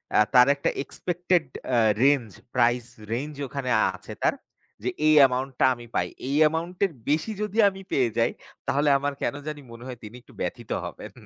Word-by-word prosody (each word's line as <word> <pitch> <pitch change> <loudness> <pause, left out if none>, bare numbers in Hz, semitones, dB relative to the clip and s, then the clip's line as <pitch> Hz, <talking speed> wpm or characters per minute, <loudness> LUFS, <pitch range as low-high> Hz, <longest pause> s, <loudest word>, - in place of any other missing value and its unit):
এহ 105 - +6
তার 125 +1 +8
একটা 140 - 0
expected 175 +2 0 0.3
অ্যা 125 -2 +3 0.2
রেঞ্জ 135 -5 +3 0.3
প্রাইস 120 -1 +3 0.3
রেঞ্জ 145 +6 -3
ওখানে 135 -1 -4 0.3
আছে - - -10
তার - - +3 0.5
যে 125 - 0 0.2
এই 155 - +6
অ্যামাউন্টটা 130 0 +3
আমি 120 0 -11
পাই। - - +1 0.2
এই 140 - -1
অ্যামাউন্ট 165 +3 0
এর 195 - -3 0.2
বেশি 155 +9 +1
যদি 210 +1 -4
আমি 195 0 -10
পেয়ে 125 -3 +2
যাই - - +3 0.4
তাহলে 145 +2 +2
আমার 145 +1 -1
কেনো 145 - -2
জানি 150 -1 -5
মনে 115 +1 -11
হয় 125 - -6
তিনি 105 +2 -9
একটু - - -20
ব্যথিত 120 -3 -4
হবেন। - - -8
140 Hz, 180 wpm, -26 LUFS, 125-155 Hz, 0.5 s, তার